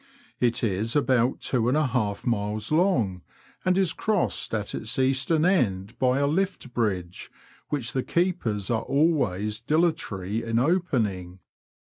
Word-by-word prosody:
It 120 0 +1
is 110 +2 0
about 130 -4 +2
two 125 - 0
miles 115 - +1
and 130 +4 +2
a 155 - +2
half 110 -6 -1
long, 110 - 0 0.4
and 185 0 +2
is 190 -4 +2
crossed 215 -4 0
at 105 -2 -2
its 115 +3 -2
eastern 135 +5 +2
end 105 - 0
by 130 0 +2
a 140 - +2
lift 170 -4 -1
bridge, 95 -7 -2 0.4
which 135 -6 -2
the 130 - 0
keepers 125 - -1
are 115 -1 +1
always 110 - +1
dilatory 115 - 0
in 115 0 -1
opening. 115 - 0
125 Hz, 140 wpm, -26 LUFS, 105-155 Hz, 0.4 s, about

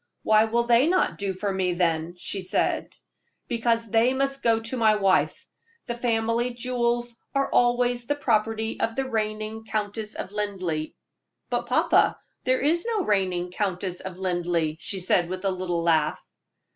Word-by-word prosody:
"Why 215 0 +5
will 235 +2 +1
they 240 +4 +4
not 365 - +1
do 200 -1 -1
for 195 +1 -3
me, 185 -2 0
then?" 170 -1 0
she 190 +2 -3
asked. - - 0 0.5
"Because 230 -1 0
they 235 +3 +3
must 275 0 0
go 230 -1 +3
to 230 +3 -5
my 220 -3 +4
wife. 195 -2 +1 0.4
The 240 - -3
family 235 0 0
jewels 240 -1 -1
are 275 0 +1
always 245 0 +2
the 290 - +1
property 225 -4 0
of 225 - -1
the 270 0 -1
reigning 215 -1 -3
Countess 215 0 -3
of - - -6
Linleigh." 185 -7 -3 0.6
"But, - - -1
papa, - - +3 0.3
there 255 0 +2
is 325 +5 +2
no 435 -6 0
reigning 185 -3 0
Countess 185 -2 -2
of 185 -1 -7
Linleigh," 175 -4 -1
she 195 - -2
said, 175 -1 +2
with 185 +1 -5
a 195 - +2
little 180 -2 -2
laugh. 160 -3 +1
215 Hz, 160 wpm, -25 LUFS, 185-240 Hz, 0.6 s, Why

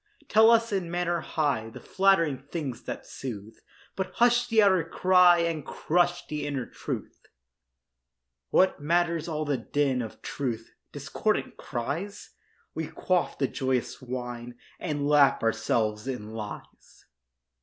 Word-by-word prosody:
Tell 220 +1 +6
us 230 0 +4
in 190 -4 -1
manner 175 0 0
high 145 -9 -1
The - - -10
flattering 185 -8 +2
things 140 -3 -6
that - - -5
soothe; 110 -4 -8 0.4
But 190 -1 -3
hush 240 0 +4
the 225 -2 +4
outer 190 -4 +4
cry 180 +1 +5
And 165 -3 -1
crush 175 +3 0
the 150 -1 -4
inner 135 -4 -2
truth. - - -7 1.2
What 185 -5 +3
matters 170 +1 +1
all 155 -2 -2
the 145 -2 0
din 135 +1 0
Of 110 -2 -8
truth—discordant 120 -5 -3
cries? 160 - -5 0.4
We - - -3
quaff 185 -2 -1
the 135 - +1
joyous 130 -1 -2
wine 120 -1 -6 0.2
And 145 -4 -2
lap 145 -4 +4
ourselves 110 -1 0
in 110 -5 -5
lies. 105 -2 -9
150 Hz, 130 wpm, -27 LUFS, 125-175 Hz, 1.2 s, Tell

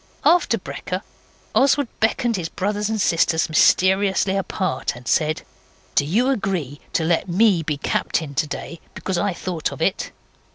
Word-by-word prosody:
After 350 0 +4
brekker - - -5 0.5
Oswald 280 0 +3
beckoned 230 +1 +1
his 175 -4 -3
brothers 205 +2 -2
and 220 -1 -1
sisters 165 -3 +2
mysteriously 190 +4 +3
apart 185 -9 -2
and 120 0 -12
said 155 0 +1 0.5
'Do 145 - +3
you 225 - +2
agree 180 - -2
to 165 - +1
let 170 +3 +1
me 190 -1 +4
be 150 -2 -2
captain 145 +1 -1
today, 155 +2 -3 0.2
because 185 -2 -2
I 205 - +1
thought 170 -3 -3
of - - -8
it? - - 0
185 Hz, 150 wpm, -22 LUFS, 160-205 Hz, 0.5 s, After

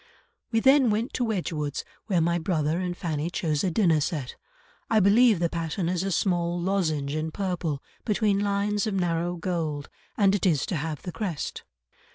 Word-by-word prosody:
"We 225 - +3
then 270 -1 +5
went 220 +3 -1
to 250 - 0
Wedgwood's 165 - -2 0.2
where 185 -6 +2
my 170 +1 +1
brother 160 -1 0
and 180 -1 -3
Fanny 160 -2 -2
chose 155 -4 -1
a 190 - +2
dinner 165 -4 +3
set. 145 -4 -3 0.5
I 220 - +4
believe 215 +3 +5
the 170 0 +1
pattern 165 +1 -2
is 175 0 0
a 195 +1 -2
small 175 -1 +1
lozenge 160 -7 0
in 155 +1 -2
purple, 170 -5 -3 0.2
between 210 -2 +1
lines 205 +1 0
of 210 - -1
narrow 175 -1 0
gold, 165 -5 -3 0.3
and 200 -2 +4
it 200 -1 +1
is 155 -6 +2
to 185 - -3
have 150 -1 -4
the 180 - -5
crest." 180 -7 -4
175 Hz, 180 wpm, -26 LUFS, 160-200 Hz, 0.5 s, then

